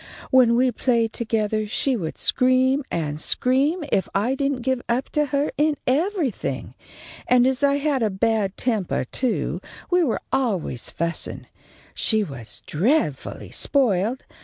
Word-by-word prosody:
When 250 -3 +5
we 255 +1 +3
played 230 -2 +1
togethah 215 -2 -1
she 265 +4 +1
would 165 -8 -4
scream 260 +2 +2
and 155 -2 -3
scream 280 - +2
if 190 - +1
I 215 +6 +2
didn't 275 -2 -1
give 260 -1 0
up 245 +3 0
to 300 -1 0
her 280 +2 0
in 300 -1 +2
everything, 315 - -1 0.5
and 250 0 +5
as 265 +1 +1
I 280 0 +4
had 285 -2 0
a 220 - +2
bad 200 0 0
tempah, 215 - 0
too, 255 -3 -1 0.3
we 355 0 +4
were 260 - -1
always 205 - -1
fussin'. 170 +1 -2 0.5
She 220 -2 +2
was 135 - -7
dreadfully 165 - -1
spoiled. 240 -2 +1
250 Hz, 140 wpm, -23 LUFS, 210-270 Hz, 0.5 s, When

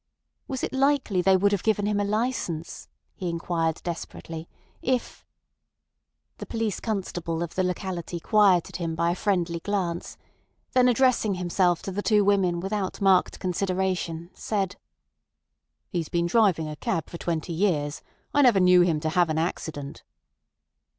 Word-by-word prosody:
Was 265 -2 -4
it - - -2
likely 265 -8 +2
they 190 +1 +5
would 200 +2 +3
have 200 -3 0
given 210 -2 +1
him 205 0 +1
a - - +1
licence, 205 -6 -2 0.3
he 180 - -4
inquired 165 -1 -1
desperately, 165 -1 -6 0.3
if— 255 -1 -2 1.1
The - - -7
police 225 -4 -2
constable 175 -6 -3
of 170 - -6
the 185 - 0
locality 180 -1 -3
quieted 195 -2 +3
him 165 -2 -3
by 170 +1 +1
a - - -1
friendly 175 -4 0
glance; 180 -3 -3 0.6
then 255 -1 +5
addressing 245 -5 +3
himself 180 -1 +1
to 195 - -4
the 200 +2 -2
two 210 -2 +3
women 190 -4 +2
without 195 0 -3
marked 190 -2 +3
consideration, 185 -2 -2
said: 195 -4 -2 1.1
"He's 170 -5 -3
been 170 0 0
driving 180 -4 +3
a 150 - -5
cab 165 - -2
for 170 - -8
twenty 170 0 -2
years. 160 -5 0 0.3
I 290 - +4
never 240 -7 +5
knew 180 -1 +6
him 170 -3 +2
to 160 - 0
have 175 +1 +2
an 155 - -1
accident." 160 -3 -3
180 Hz, 150 wpm, -26 LUFS, 170-205 Hz, 1.1 s, knew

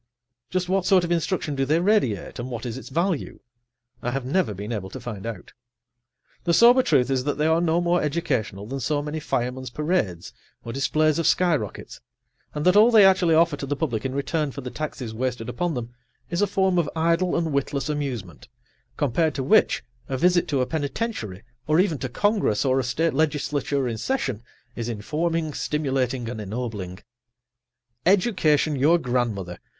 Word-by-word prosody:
Just 185 -1 -1
what 185 0 0
sort 190 -3 +5
of 170 - -2
instruction 165 -2 0
do 135 -1 0
they 155 +4 +2
radiate, 175 - +1
and 120 +2 -4
what 120 -1 -5
is 120 -2 -4
its 130 - -8
value? 170 +3 -1 0.6
I 120 - -2
have 130 +1 -3
never 145 - 0
been 105 +4 -6
able 100 -4 -4
to - - -8
find 110 -3 -6
out. 110 -6 -7 0.9
The 170 -1 +2
sober 245 +2 +7
truth 135 - +2
is 130 -1 +1
that 145 -1 -1
they 150 - +1
are 160 +1 +3
no 170 0 +2
more 175 0 +2
educational 135 - -2
than 135 +5 -5
so 145 +2 -1
many 150 +1 -4
firemen's 125 -2 -2
parades 135 - -2 0.3
or 115 - -5
displays 155 +4 +1
of 165 - +1
sky 175 -2 +3
[Pg - - 0
81]rockets, - - -11 0.6
and 150 - -2
that 180 +1 +5
all 215 +3 +7
they 220 -4 +7
actually 185 -4 +4
offer 165 -1 +4
to 140 - -5
the 145 - -1
public 125 -8 -2
in 130 0 -3
return 150 +2 -1
for 140 - -7
the 125 -1 -6
taxes 135 -7 -5
wasted 120 -1 -3
upon 170 +5 -2
them 120 -1 -5 0.4
is 170 +3 0
a 205 - +3
form 190 -2 +2
of 170 - 0
idle 170 +2 +1
and 165 -3 -1
witless 140 0 -1
amusement, 130 - -4 0.5
compared 150 +3 +1
to 135 - -2
which 215 +12 +3 0.3
a 130 - -1
visit 175 +4 +3
to 140 -3 0
a - - +2
penitentiary, 145 - -3 0.2
or 155 +2 +3
even 175 -7 +2
to 130 - -3
Congress 200 - +1
or 130 0 +3
a - - 0
state 160 +7 0
legislature 145 -2 0
in 115 -2 -3
session, 130 - -2 0.3
is 115 0 -4
informing, 155 +8 -2
stimulating 130 -5 -1
and 115 -2 -5
ennobling. 105 -4 -5 1.1
Education 175 -6 +3
your 150 +6 +4
grandmother! 115 - -2
145 Hz, 185 wpm, -24 LUFS, 125-170 Hz, 1.1 s, sober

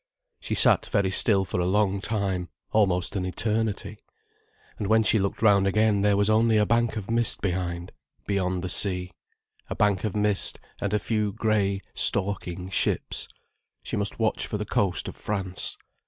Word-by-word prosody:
She - - -3
sat - - +4
very 95 -2 +1
still 95 0 +3
for 90 - -3
a 90 - +1
long 100 0 +1
time, 95 -5 -2 0.2
almost 95 -4 +1
an 95 - -1
eternity. 110 +3 -2 0.8
And 105 - -2
when 110 +1 +4
she 110 0 +3
looked 100 +2 -2
round 100 -2 +5
again 110 0 +2
there 100 0 +3
was 100 0 +2
only 110 +1 +3
a 105 - +4
bank 115 +1 +1
of 105 +1 -5
mist 115 0 +3
behind, 90 -2 -3 0.3
beyond 95 -2 -1
the - - -2
sea: 90 -1 -1 0.6
a - - -3
bank 100 -3 +1
of 105 -3 -2
mist, 105 -1 0 0.2
and 100 - -1
a 105 - +2
few 105 -1 -1
grey, 100 -2 0
stalking 95 -2 -1
ships. - - 0 0.6
She - - -4
must 100 0 -1
watch 110 -1 0
for 105 - -3
the 105 - -4
coast 100 -2 0
of - - -6
France. 95 -3 -3
100 Hz, 170 wpm, -26 LUFS, 95-110 Hz, 0.8 s, round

